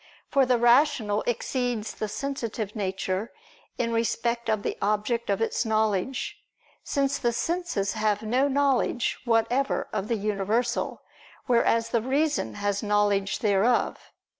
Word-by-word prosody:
For 275 Hz, -2 st, +4 dB
the 250 Hz, -1 st, +3 dB
rational 240 Hz, -3 st, +3 dB
exceeds 240 Hz, -1 st, -1 dB
the 215 Hz, -, -4 dB
sensitive 230 Hz, -4 st, -4 dB
nature 190 Hz, 0 st, -2 dB, 0.5 s
in 230 Hz, -1 st, -1 dB
respect 235 Hz, +1 st, 0 dB
of 215 Hz, -2 st, 0 dB
the -, -, -2 dB
object 210 Hz, +3 st, 0 dB
of 200 Hz, +1 st, +1 dB
its -, -, 0 dB
knowledge: 220 Hz, -, -1 dB, 0.4 s
since 280 Hz, -1 st, 0 dB
the 240 Hz, -, +1 dB
senses 330 Hz, -, -1 dB
have 215 Hz, -1 st, 0 dB
no 250 Hz, +6 st, +2 dB
knowledge 275 Hz, -3 st, +1 dB
whatever 240 Hz, +4 st, +1 dB
of 210 Hz, -1 st, -2 dB
the 230 Hz, -, 0 dB
universal, 215 Hz, +4 st, -1 dB, 0.4 s
whereas 230 Hz, -1 st, +2 dB
the 235 Hz, -, +1 dB
reason 265 Hz, -, 0 dB
has 205 Hz, 0 st, -1 dB
knowledge 205 Hz, -2 st, +1 dB
thereof. 215 Hz, +3 st, +2 dB
230 Hz, 130 wpm, -26 LUFS, 210-250 Hz, 0.5 s, For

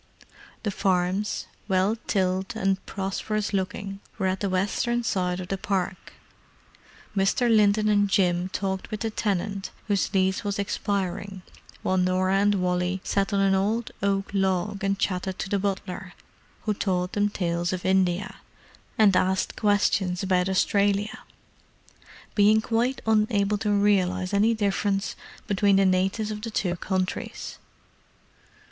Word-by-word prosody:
The 210 Hz, -, -1 dB
farms, 185 Hz, +2 st, 0 dB, 0.2 s
well 190 Hz, +2 st, +2 dB
tilled 190 Hz, -1 st, 0 dB
and 195 Hz, 0 st, 0 dB
prosperous 205 Hz, +2 st, -2 dB
looking, 195 Hz, +1 st, -3 dB, 0.2 s
were 195 Hz, -, -1 dB
at 185 Hz, 0 st, 0 dB
the 200 Hz, -, -1 dB
western 205 Hz, +6 st, 0 dB
side 180 Hz, -4 st, 0 dB
of 180 Hz, -, -6 dB
the 195 Hz, -, -2 dB
park: 190 Hz, -1 st, -2 dB, 1.0 s
Mr. 220 Hz, +4 st, +3 dB
Linton 210 Hz, 0 st, +4 dB
and 205 Hz, -1 st, +3 dB
Jim 180 Hz, -2 st, +2 dB
talked 190 Hz, 0 st, -3 dB
with 215 Hz, -1 st, -5 dB
the 225 Hz, -1 st, -1 dB
tenant 200 Hz, -1 st, -2 dB, 0.2 s
whose 200 Hz, -2 st, +1 dB
lease 190 Hz, 0 st, +1 dB
was 205 Hz, -1 st, -2 dB
expiring 200 Hz, -1 st, -2 dB, 0.4 s
while 185 Hz, -, +1 dB
Norah 185 Hz, +1 st, +2 dB
and 205 Hz, +1 st, +3 dB
Wally 180 Hz, 0 st, 0 dB
sat 200 Hz, +1 st, 0 dB
on 200 Hz, -1 st, +2 dB
an 195 Hz, -1 st, +3 dB
old 215 Hz, +4 st, 0 dB
oak 195 Hz, 0 st, 0 dB
log 195 Hz, +1 st, 0 dB
and 195 Hz, 0 st, +1 dB
chatted 185 Hz, -1 st, -2 dB
to -, -, -4 dB
the 200 Hz, -, +1 dB
butler, 190 Hz, -1 st, -3 dB, 0.5 s
who 215 Hz, -, 0 dB
told 180 Hz, -2 st, -1 dB
them 205 Hz, 0 st, +2 dB
tales 175 Hz, -3 st, -1 dB
of 185 Hz, -1 st, -4 dB
India, 185 Hz, 0 st, +1 dB, 0.6 s
and 205 Hz, -4 st, +5 dB
asked 190 Hz, +1 st, +1 dB
questions 200 Hz, -3 st, +1 dB
about 185 Hz, -1 st, +2 dB
Australia, 200 Hz, +2 st, +1 dB, 1.1 s
being 210 Hz, +1 st, +5 dB
quite 235 Hz, +4 st, 0 dB
unable 210 Hz, -2 st, +2 dB
to 210 Hz, -, -1 dB
realize 190 Hz, -2 st, +2 dB
any 215 Hz, +3 st, +3 dB
difference 200 Hz, -1 st, 0 dB, 0.3 s
between 200 Hz, 0 st, +3 dB
the 195 Hz, 0 st, +4 dB
natives 190 Hz, +4 st, +1 dB
of 210 Hz, 0 st, -5 dB
the 230 Hz, -, -4 dB
two 185 Hz, -5 st, -1 dB
countries. 185 Hz, +1 st, -3 dB
195 Hz, 140 wpm, -26 LUFS, 185-205 Hz, 1.1 s, and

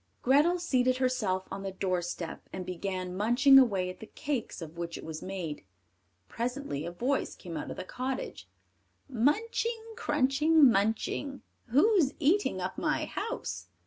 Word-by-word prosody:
Grethel 295 Hz, +8 st, +4 dB
seated 255 Hz, -7 st, +1 dB
herself 220 Hz, -8 st, 0 dB
on 195 Hz, -, -5 dB
the 195 Hz, 0 st, -4 dB
doorstep, 180 Hz, -3 st, -3 dB
and 185 Hz, -1 st, -5 dB
began 185 Hz, 0 st, -4 dB
munching 245 Hz, +7 st, +6 dB
away 200 Hz, -8 st, +2 dB
at 180 Hz, 0 st, -7 dB
the 220 Hz, -, -9 dB
cakes 275 Hz, -6 st, -4 dB
of 165 Hz, -1 st, -8 dB
which 170 Hz, 0 st, -5 dB
it -, -, -9 dB
was 160 Hz, -1 st, -6 dB
made. 180 Hz, -, -5 dB, 0.6 s
Presently 235 Hz, -, -3 dB
a -, -, -4 dB
voice 250 Hz, +10 st, -1 dB
came 170 Hz, -3 st, -8 dB
out 150 Hz, -, -4 dB
of -, -, -6 dB
the -, -, -4 dB
cottage: 255 Hz, +6 st, -5 dB, 0.6 s
"Munching, 445 Hz, -, 0 dB
crunching, 300 Hz, -, +4 dB
munching, 225 Hz, +6 st, -1 dB, 0.2 s
Who's 305 Hz, -, +4 dB
eating 345 Hz, +7 st, +2 dB
up -, -, -4 dB
my -, -, 0 dB
house?" 480 Hz, +2 st, -4 dB
245 Hz, 145 wpm, -30 LUFS, 185-285 Hz, 0.6 s, munching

